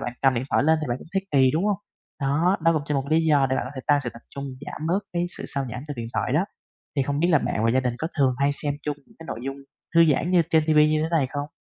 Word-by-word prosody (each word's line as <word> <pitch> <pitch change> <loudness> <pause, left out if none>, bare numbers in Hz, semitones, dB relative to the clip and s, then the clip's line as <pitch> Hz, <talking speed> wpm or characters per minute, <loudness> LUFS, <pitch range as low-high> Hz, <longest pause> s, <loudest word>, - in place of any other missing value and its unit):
bạn 125 - -3
cầm 135 -1 +4
điện 120 - -1
thoại - - +3
lên 160 +1 +4
thì 150 - -3
bạn 120 +2 -1
cũng - - -13
thấy 195 0 -1
kỳ, 130 -2 +5
đúng 165 +6 +1
hông? 205 -2 +1 0.4
Đó, 160 +8 +2
nó 165 0 +5
cũng 155 -2 0
cho 150 - -1
một 135 -1 0
lý 160 +1 +3
do 145 -4 +4
để 130 - +2
bạn - - -1
có - - -6
thể 130 - -5
tăng 145 -1 +4
sự 120 -3 -4
tập 115 - -13
trung, 140 0 -7 0.2
giảm 155 - -5
bớt 180 +4 +2
cái 175 0 0
sự - - -7
sao 140 -1 -2
nhãng 125 +4 -6
từ 145 - -3
điện 115 -1 -5
thoại 125 - 0
đó. 160 +6 +3 0.5
Thì 135 - +3
không 145 +2 -1
biết 175 - +3
là 155 -4 +5
bạn 110 -3 -1
và 115 - +4
gia 130 +2 +3
đình 125 -2 -1
có 160 - -2
thường 130 -2 +3
hay 140 +1 +3
xem 145 0 -2
chung 145 -1 -2
những - - -23
cái 165 - -11
nội - - -5
dung 135 +1 -4 0.4
thư 165 0 +7
giãn 160 +3 +2
như 175 -2 +5
trên 160 -1 +4
TV 155 -1 +2
như 155 0 +5
thế 160 - -1
này 155 -6 +2
không? 145 +2 -4
145 Hz, 325 wpm, -24 LUFS, 135-160 Hz, 0.5 s, thư